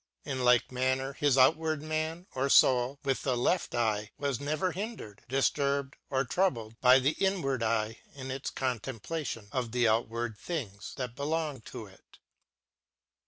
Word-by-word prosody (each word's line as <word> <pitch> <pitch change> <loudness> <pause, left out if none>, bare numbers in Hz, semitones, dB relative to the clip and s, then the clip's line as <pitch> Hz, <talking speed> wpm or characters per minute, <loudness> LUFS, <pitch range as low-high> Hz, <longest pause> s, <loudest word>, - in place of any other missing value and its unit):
In 130 -3 -2
like 125 0 +4
manner 130 +2 0
his 140 -1 +2
out 130 +4 +7
ward 155 -2 -2
man, 155 +2 -2
or 135 +1 0
foul 130 +1 +5
with 135 -2 0
the 130 -3 0
left 175 +7 0
eye, 110 -3 0
was 140 -4 -1
never 155 +5 0
hindered, 185 - -6
difturbed 140 +1 +1 0.2
or 135 0 +1
trou 190 +10 +3
bled 115 -4 -10
by 125 0 +8
the 135 +2 +2
inward 170 -10 +1
eye 110 0 0 0.2
in 130 -1 -6
its 135 +1 -3
contem 125 -2 -3
plation 140 -6 -4
of 125 -3 -2
the 120 -1 +3
outward 115 0 0
things 105 - -5
that 125 -3 -5
belonged 145 -3 -2
to - - -7
it. - - -19
130 Hz, 165 wpm, -30 LUFS, 120-145 Hz, 0.2 s, by